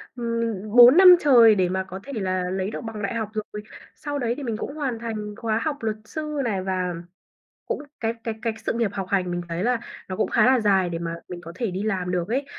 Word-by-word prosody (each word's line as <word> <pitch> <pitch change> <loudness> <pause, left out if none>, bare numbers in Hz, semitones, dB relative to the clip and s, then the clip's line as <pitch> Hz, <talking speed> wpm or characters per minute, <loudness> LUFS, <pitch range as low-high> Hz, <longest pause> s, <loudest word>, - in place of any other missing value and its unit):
ừm, 230 -1 -2 0.2
4 245 +4 +9
năm 365 -1 +10
trời 240 -8 +6
để 185 -2 +1
mà 190 +1 -1
có 190 0 -8
thể 280 - -8
là 185 -4 -2
lấy 190 +2 -2
được - - -5
bằng 225 -2 -7
đại 200 - -2
học 220 -2 -2
rồi. 210 -1 -5 0.3
Sau 290 -1 -4
đấy 235 -3 0
thì 285 - -6
mình 225 -3 -3
cũng 280 - -6
hoàn 265 -7 -3
thành 215 -3 -5
khóa 225 -1 -1
học 295 -2 -1
luật 220 -1 -1
sư 300 +3 -5
này 205 -5 -1
và 185 -2 -2 0.7
cũng - - -3 0.2
cái 225 0 -1
cái 225 - -2
cái 230 -2 -1
sự - - 0
nghiệp 230 -4 0
học 195 -2 -4
hành 185 -3 0
mình 175 0 -2
thấy 170 +3 -2
là 245 -1 +1 0.3
nó 185 - -4
cũng - - 0
khá 230 0 +3
là 260 -1 +4
dài 195 -4 +2
để 165 -1 -4
mà 165 0 -4 0.2
mình 175 - -6
có 170 - -8
thể 225 -4 -2
đi 190 +3 -3
làm 185 -4 -1
được 180 0 -1
ấy. 270 +4 -1
220 Hz, 255 wpm, -24 LUFS, 190-240 Hz, 0.7 s, năm